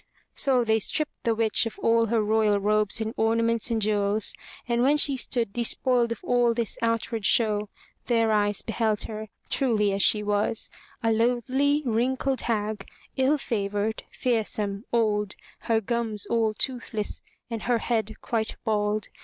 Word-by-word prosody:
So 260 -3 +2
they 220 -1 +2
stripped 305 +8 -2
the 230 -1 +2
witch 225 +1 +2
of 225 - -8
all 230 0 +2
her 225 0 +1
royal 210 -1 +2
robes 210 +1 +1
and 220 0 -3
orna 225 +1 +2
ments 230 0 +1
and 230 -1 0
jewels 205 0 +1 0.3
and 235 0 +1
when 280 +4 +4
she 285 -2 +3
stood 235 -4 +1
despoiled 240 +1 +1
of 230 - -5
all 245 -6 +2
this 230 -3 0
outward 230 -1 -1
show, 210 -1 +2 0.4
their 230 -2 +2
eyes 205 -1 +1
beheld 220 -2 0
her 215 0 -6 0.2
truly 215 -6 +2
as 200 - 0
she 210 +1 +4
was, 205 +2 -1 0.3
a 225 - +2
loathly, 255 +6 +1
wrinkled 255 +3 0
hag, 215 -3 -2 0.3
ill 270 +3 +2
favored, 210 -3 -2
fearsome, 215 -3 -1
old, 210 -3 +1 0.2
her 225 -1 +1
gums 225 -2 -2
all 225 -2 0
toothless 235 -4 -2 0.3
and 225 -1 -3
her 240 - +4
head 220 -2 -1
quite 225 -2 -2
bald. 210 -1 0
225 Hz, 155 wpm, -26 LUFS, 210-235 Hz, 0.4 s, when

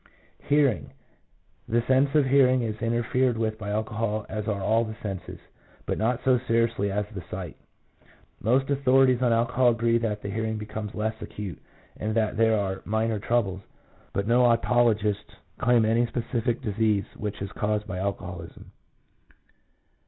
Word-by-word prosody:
Hearing. 140 -8 +2 0.4
— - - -40
The 115 +1 +2
sense 135 +3 +2
of 150 -2 +5
hearing 130 -2 +4
is 110 -1 -4
interfered 120 +1 +1
with 110 -1 -2
by 105 -1 -5
alcohol 110 0 -2
as 105 0 -4
are 105 -2 -1
all 110 +4 +2
the 110 -1 -6
senses, 95 -4 -5 0.5
but - - -2
not 115 +3 0
so 130 -2 +4
seriously 115 -4 0
as 105 +1 -1
the 95 - -5
sight. 90 -4 -6 0.9
Most 130 +5 +2
authorities 135 -2 +4
on 125 -2 +3
alcohol 120 +2 +3
agree 115 0 +2
that 105 -3 -2
the - - -4
hearing 110 +1 -2
becomes 105 0 -6
less 110 +1 -1
acute, 100 -4 -7 0.4
and 110 +1 -2
that 110 -1 +1
there 110 0 +3
are 95 -2 -2
minor 110 0 0
troubles, 100 -4 0 0.5
but 100 - -1
no 120 +2 +4
otologists 115 -3 +2 0.2
claim 120 -2 +4
any 115 +2 +2
specific 120 0 -2
disease 105 -1 +1
which 105 -1 -5
is 100 0 -5
caused 105 0 -1
by 90 -2 -5
alcoholism. 90 -3 -5
110 Hz, 155 wpm, -26 LUFS, 105-120 Hz, 0.9 s, of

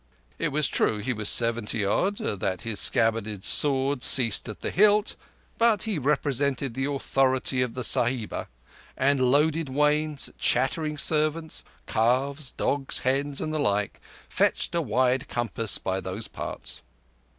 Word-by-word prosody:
It 165 -3 -1
is 150 -2 +2
true 110 - 0
he 120 +5 -3
was 105 -2 0
seventy 115 -2 +4
odd, 195 - 0
that 95 -3 -3
his 115 -3 0
scabbarded 110 -3 +1
sword 135 +1 +2
ceased 115 -6 +6
at 105 - -9
the - - -3
hilt; 210 +2 +2 0.4
but 230 -4 +3
he 215 -8 -2
represented 140 -2 -1
the 135 +3 -3
authority 135 -2 0
of 125 -2 -3
the 125 - -4
Sahiba, 120 0 +1 0.5
and 140 0 +1
loaded 145 +4 +1
wains, 150 +1 0
chattering 150 +5 0
servants, 155 +1 0 0.2
calves, 130 +5 -1
dogs, 140 -1 -2
hens, 140 +2 0
and 155 - -4
the 155 - -2
like, 105 -6 -1 0.3
fetched - - -1
a 170 - 0
wide 130 0 0
compass 115 -2 -2
by 95 0 -3
those - - -5
parts. - - -4
135 Hz, 140 wpm, -25 LUFS, 115-150 Hz, 0.5 s, ceased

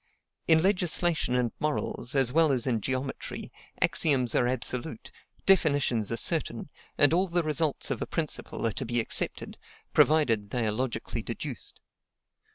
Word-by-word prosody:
In 160 0 +5
legislation 175 -7 +2
and 125 -2 0
morals, 150 -3 -2
as 130 -2 +2
well 160 -1 +4
as 125 -3 +1
in 120 -4 0
geometry, 130 +3 -5 0.3
axioms 130 -7 +3
are 120 - +2
absolute, 125 0 -2 0.3
definitions 145 - +2
are 115 - -1
certain; - - -1 0.3
and 145 +2 +4
all 185 +3 +2
the 175 -1 0
results 155 -2 -1
of 125 - -3
a - - -3
principle 155 -6 -3
are 115 - +1
to - - -4
be 120 0 +2
accepted, 115 - 0 0.3
provided 115 -10 +3
they 120 +1 -1
are 105 - 0
logically 120 +2 -3
deduced. - - -7
135 Hz, 150 wpm, -28 LUFS, 120-160 Hz, 0.3 s, In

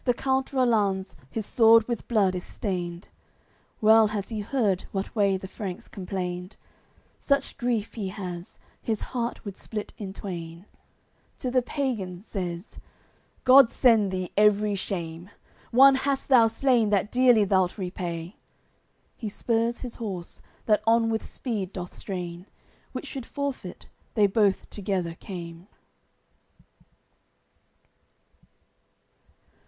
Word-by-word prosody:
CXXI - - -33
The 245 - +4
count 265 +1 0
Rollanz, 210 -7 +1
his 220 +7 -3
sword 225 0 +5
with 235 -2 -3
blood 205 -5 +3
is 180 -1 -4
stained, 175 -4 -4 0.7
Well 220 0 +7
has 205 -2 -4
he 220 -2 -3
heard 205 -4 0
what 195 +3 -4
way 200 -3 +3
the 190 - -8
Franks 190 -2 -6
complained; 180 0 -5 0.6
Such 280 -1 0
grief 235 -3 -1
he 210 -4 -4
has, 180 -2 -7 0.2
his 220 -2 -2
heart 240 -2 -4
would 200 -2 -6
split 210 0 -6
in 200 -3 -5
twain: 170 -3 -7 0.7
To 250 - -3
the 255 0 +3
pagan 220 - -3
says: 180 -3 -5 0.6
"God 255 -1 +8
send 225 -6 +4
thee 185 -1 -3
every 210 0 +4
shame! 175 -3 -4 0.4
One 270 +3 +7
hast 275 +1 -1
thou 240 -4 +7
slain 230 -1 +2
that 205 0 +1
dearly 245 -4 +5
thou'lt 190 -1 +2
repay." 180 -1 -5 0.8
He 220 - -5
spurs 230 +2 0
his 245 -2 -6
horse, 190 -6 -6 0.2
that 210 -1 +3
on 225 0 +4
with 220 - -1
speed 205 -7 -4
doth 180 -1 -6
strain; 180 -1 -6 0.4
Which - - -6
should 265 -5 -6
forfeit, 280 -2 -5 0.3
they 210 -3 +5
both 200 -1 +2
together 190 -4 -2
came. 170 0 -9
205 Hz, 125 wpm, -26 LUFS, 185-235 Hz, 0.8 s, God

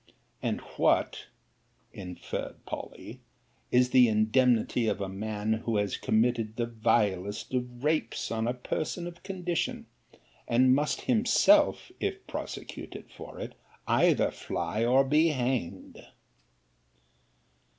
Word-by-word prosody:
And - - -1 0.2
what, - - +1 0.7
inferred 90 -3 -6
Polly, - - -8 0.5
is 125 0 +4
the 125 -2 +7
indemnity 115 +2 +2
of 105 - 0
a 100 - -2
man 105 +2 -2
who 115 -2 0
has 105 -1 0
committed 110 -1 +1
the 120 - 0
vilest 105 -3 0
of 125 0 -3
rapes 150 -6 0
on 115 0 -1
a 120 - -1
person 155 +7 -3
of 175 0 -9
condition; 180 -3 -3 0.6
and 130 +2 +4
must 150 +3 0
himself, 265 +8 +3
if 400 -1 -3
prosecuted - - -7
for - - -10
it, - - -6 0.3
either - - +3
fly, 110 +2 -3
or 130 +3 +5
be 150 +4 +3
hanged? 130 - -2
125 Hz, 115 wpm, -29 LUFS, 110-150 Hz, 0.7 s, the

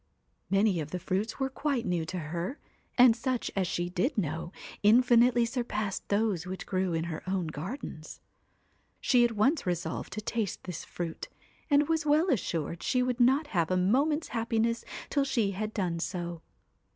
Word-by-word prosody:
Many 195 -1 +3
of 150 -2 -4
the 180 - -3
fruits 190 +5 -2
were 270 - +1
quite 275 -3 -1
new 175 -4 -1
to 185 - -4
her, 170 - -4 0.4
and 245 -2 +8
such 250 +1 -2
as 190 -2 +1
she 175 +1 -1
did 185 - -1
know, 165 -2 -2 0.3
in 220 +5 +6
finitely 240 0 +4
surpassed 215 -5 -3
those 200 -4 +1
which 185 +1 -5
grew 185 -2 0
in 160 - 0
her 165 -2 -4
own 185 -2 0
gardens. 155 - -6 0.8
She 245 -3 +4
at 240 -1 +2
once 260 - +2
resolved 175 0 -2
to - - -3
taste 215 -2 -2
this 180 -3 -6
fruit, 170 -2 -5 0.4
and 285 0 +4
was 325 -1 +1
well 305 +4 +3
assured 170 - -1
she 250 -1 +1
would 250 -1 -1
not 265 +5 +4
have 170 -3 +2
a 185 - +2
moment's 280 - +2
happiness 230 0 0 0.3
till 280 - +2
she 230 -7 +1
had 215 +3 -3
done 180 -6 -1
so. 175 -2 -4
210 Hz, 175 wpm, -29 LUFS, 175-250 Hz, 0.8 s, and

